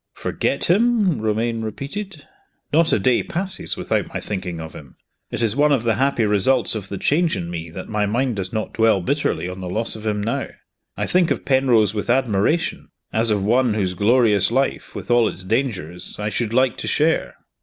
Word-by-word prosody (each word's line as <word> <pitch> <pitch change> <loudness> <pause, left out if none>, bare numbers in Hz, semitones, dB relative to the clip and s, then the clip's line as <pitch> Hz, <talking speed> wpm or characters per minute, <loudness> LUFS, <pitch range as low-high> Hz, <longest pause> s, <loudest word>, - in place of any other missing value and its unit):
"Forget 140 - -2
him?" 205 - +2
Romayne 115 +1 -1
repeated. 145 - -6 0.5
"Not 165 +1 +4
a - - +4
day 125 -2 +2
passes 190 +2 -2
without - - -1
my - - -3
thinking 90 -4 -5
of 80 0 -8
him. 70 -3 -12 0.3
It 120 - -3
is 110 -1 +1
one 145 +1 +3
of 135 -5 +2
the 115 -1 +2
happy 130 -2 +1
results 105 +5 +2
of 100 -3 -5
the 100 - -4
change 160 - +1
in 85 -1 -5
me 85 -1 -5
that 90 +3 -8
my 105 -1 0
mind 120 +2 0
does 95 -1 -4
not 110 - -3
dwell 110 -4 +3
bitterly 90 - -1
on 90 +1 -7
the 90 - -5
loss 110 +5 -2
of 110 0 -7
him 105 -1 0
now. 115 - -2 0.5
I - - -1
think 180 -2 +2
of - - -2
Penrose 125 -7 +3
with 105 +1 -4
admiration, 125 - +1 0.3
as 115 +1 +3
of 105 -2 +1
one 120 +1 +2
whose 95 -4 0
glorious 105 +1 +3
life, 135 -3 -1
with 100 +1 -5
all 120 -2 +4
its 95 - -8
dangers, 95 - -3
I 105 0 -2
should 110 0 -2
like 130 0 +2
to - - -5
share!" - - +1
115 Hz, 200 wpm, -21 LUFS, 100-135 Hz, 0.5 s, Not